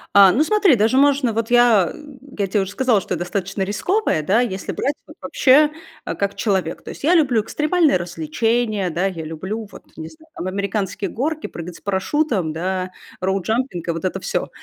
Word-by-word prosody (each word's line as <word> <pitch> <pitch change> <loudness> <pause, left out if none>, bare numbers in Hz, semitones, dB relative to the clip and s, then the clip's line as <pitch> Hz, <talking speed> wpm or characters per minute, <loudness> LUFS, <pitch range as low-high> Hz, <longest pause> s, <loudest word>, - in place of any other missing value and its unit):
А, 200 -2 +8
ну 275 +11 +3
смотри, 395 -3 +4
даже 225 +4 +2
можно, 275 -4 +3
вот 225 +1 -2
я, 235 -7 +5
э, - - -12 0.4
я 200 - +1
те 205 +2 0
уже 190 0 -4
сказала, 240 0 +2
что 190 - -5
я - - -1
достаточно 195 +2 -3
рисковая, 205 - 0
да, 205 +9 +3
если 195 -6 -3
брать 285 +3 -1
вот - - -14
вообще, 290 +3 +4 0.3
а, - - -4
как 200 0 -1
человек. 190 -5 -1
То - - -9
есть - - -10
я 325 +5 +4
люблю 265 -10 +3
экстремальные 310 - +2
развлечения, 195 +5 -1
да, 175 +3 -1
я 180 -4 -3
люблю 190 +8 -5
вот, - - -12
не 160 - -6
знаю, 315 0 -19
там 180 - -5
американские 200 0 -2
горки, 310 +5 -2
прыгать 170 0 -7
с - - -14
парашютом, 200 - -1
да, 185 +3 -2 0.3
роупжампинг 190 +1 -1
и - - +1
вот 165 -1 -5
это 185 +1 -2
всё. - - -2
200 Hz, 195 wpm, -20 LUFS, 185-260 Hz, 0.4 s, А